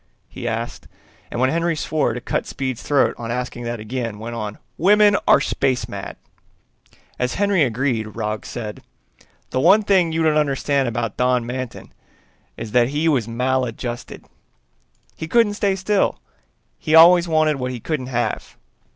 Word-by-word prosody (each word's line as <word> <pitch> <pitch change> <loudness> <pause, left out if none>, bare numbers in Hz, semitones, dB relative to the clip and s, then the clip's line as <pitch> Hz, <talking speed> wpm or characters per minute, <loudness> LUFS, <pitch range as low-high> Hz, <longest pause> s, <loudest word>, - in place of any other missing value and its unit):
he - - -7
asked, - - -4 0.4
and 120 - -4
when 130 +1 +2
Henry 170 +1 0
swore 150 -5 0
to - - -3
cut - - -2
Speed's 130 -3 -4
throat 145 -2 +2
on 115 -1 -5
asking 125 0 -4
that 120 -1 -3
again, 115 0 -4
went 115 +2 -6
on, 105 -3 -5 0.2
"Women 205 +3 +5
are - - +6
space 130 -2 -1
mad!" - - -7 1.0
As 125 0 -1
Henry 200 -2 +2
agreed, 120 -4 0
Roggs 105 0 -3
said, 110 -3 -6 0.7
"The 130 - 0
one 195 +9 +5
thing 185 -5 +3
you 160 0 0
don't 155 -1 +3
understand 140 -2 +1
about 115 -2 -3
Don 125 -1 +2
Manton 125 0 -6 0.6
is 110 - -6
that 120 +1 +3
he 150 +3 0
was 130 -8 +2
maladjusted. 125 0 -3 0.9
He 160 - -6
couldn't 230 +2 +3
stay 200 -2 0
still, 195 +1 0 0.6
he 155 - +1
always 175 +2 +8
wanted 155 -2 +2
what 125 -1 -3
he 125 -1 -5
couldn't 135 0 -3
have. 120 -2 -3
130 Hz, 160 wpm, -21 LUFS, 120-160 Hz, 1.0 s, always